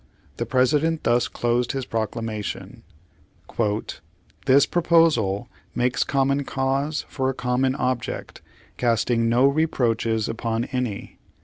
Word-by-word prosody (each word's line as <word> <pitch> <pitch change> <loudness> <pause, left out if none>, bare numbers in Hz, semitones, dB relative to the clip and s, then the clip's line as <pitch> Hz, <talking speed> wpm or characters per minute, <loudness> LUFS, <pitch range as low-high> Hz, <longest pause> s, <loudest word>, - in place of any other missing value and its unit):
The - - -3
President 150 +5 +2
thus 120 0 +2
closed 120 +1 0
his 135 -2 -3
proclamation: 110 -1 -4 1.7
"This 140 +1 +6
proposal 160 - +2 0.3
makes 125 0 +1
common 140 +1 +1
cause 135 +3 -1
for 130 -1 -1
a 135 - -3
common 130 +1 0
ob 130 -3 0
ject, - - -7 0.4
casting 115 -1 +1
no 120 +3 +4
reproaches 120 -7 +1
upon 115 0 -2
any. 125 -6 -4
125 Hz, 110 wpm, -23 LUFS, 115-140 Hz, 1.7 s, This